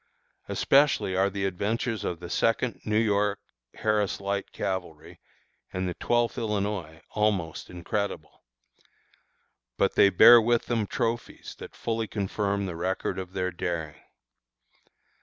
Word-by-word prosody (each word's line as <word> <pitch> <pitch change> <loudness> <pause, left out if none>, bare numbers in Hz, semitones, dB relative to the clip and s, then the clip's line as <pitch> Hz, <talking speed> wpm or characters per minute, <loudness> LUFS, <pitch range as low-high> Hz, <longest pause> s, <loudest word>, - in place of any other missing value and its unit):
Especially 135 -9 +3
are 95 +1 +3
the 100 0 -3
adventures 105 +4 -2
of 85 - -3
the 85 -1 -8
Second 115 +1 0
New 105 0 +1
York 105 -2 +2 0.4
(Harris 105 -2 0
Light 100 0 -3
Cavalry) 85 -5 -5 0.5
and 95 0 -2
the 90 - -2
Twelfth 120 +5 0
Illinois 100 -7 -3
almost 100 -6 -1
incredible. 100 +4 -4 1.4
But - - +2
they 100 - +6
bear 120 +5 +9
with 120 +1 +1
them 115 -4 -1
trophies 120 -2 -3
that - - -10
fully 115 -1 -2
confirm 100 -1 -1
the 90 -3 -4
record 95 +2 -2
of 95 0 -7
their 90 -1 -1
daring. 80 -4 -4
100 Hz, 125 wpm, -27 LUFS, 90-110 Hz, 1.4 s, bear